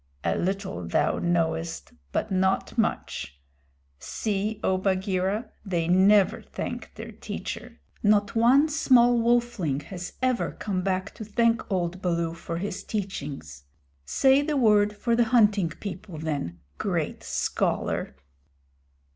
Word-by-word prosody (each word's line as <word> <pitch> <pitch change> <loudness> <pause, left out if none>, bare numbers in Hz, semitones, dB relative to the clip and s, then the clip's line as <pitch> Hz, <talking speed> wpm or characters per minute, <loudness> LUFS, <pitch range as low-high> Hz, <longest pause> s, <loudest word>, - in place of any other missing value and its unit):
"A 85 - +1
little 185 - -2
thou 85 - +1
knowest, 165 -1 -1 0.2
but - - -2
not 190 0 +1
much. 70 0 -2 0.6
See, 210 0 -2
O 185 0 +2
Bagheera, 190 +2 0
they 175 -5 -1
never 195 +4 +4
thank - - -6
their - - -8
teacher. - - -7 0.2
Not 205 0 +3
one 255 +6 +5
small 245 -6 +4
wolfling 230 - +1
has 180 -2 -7
ever 255 -2 0
come 190 -3 -2
back 185 0 -2
to 225 - -8
thank 230 +1 +1
old 180 0 -1
Baloo 170 -2 0
for 170 0 -5
his 200 +4 -4
teachings. 140 - -5 0.4
Say 265 - +4
the 295 0 -1
word 210 -4 +4
for 235 +2 +1
the 240 0 +3
Hunting 210 -6 +4
People, 180 0 -7
then 145 - -4 0.2
great - - -2
scholar." - - -1
195 Hz, 125 wpm, -26 LUFS, 170-225 Hz, 0.6 s, one